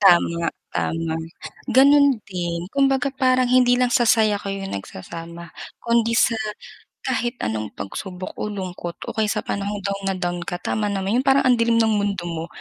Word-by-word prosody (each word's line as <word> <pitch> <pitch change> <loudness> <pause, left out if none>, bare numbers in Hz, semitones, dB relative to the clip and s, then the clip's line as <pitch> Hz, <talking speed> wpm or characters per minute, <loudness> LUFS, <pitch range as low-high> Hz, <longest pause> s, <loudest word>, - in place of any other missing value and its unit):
Tama, 170 -3 +4 0.2
tama. 165 -1 -2 0.6
Ganun 280 -3 +6
din 175 0 -4
kumbaga 275 -1 +2
parang 255 -2 +2
hindi 250 -1 +5
lang 250 0 +2
sa 240 0 +3
saya 215 -2 +4
kayo 195 -1 -5
nagsasama, 165 - -8 0.3
kundi 230 -1 +2
sa 230 -1 +3 0.6
kahit 240 +1 -1
anong 110 -1 -3
pagsubok 185 - -6
o - - -2
lungkot, 180 -3 -5 0.2
o - - -7
kaya 220 -1 +2
sa - - 0
panahong 200 +1 -3
down 200 0 -3
na 195 - +1
down 175 -1 -2
ka, 175 +1 -5
tama 210 -1 -1
naman, 195 +4 0
yung 265 - -1
parang 270 0 +5
ang 250 -1 +5
dilim 230 0 +3
ng 225 - +4
mundo 205 -3 0
mo, 165 -1 -4
205 Hz, 170 wpm, -22 LUFS, 175-245 Hz, 0.6 s, Ganun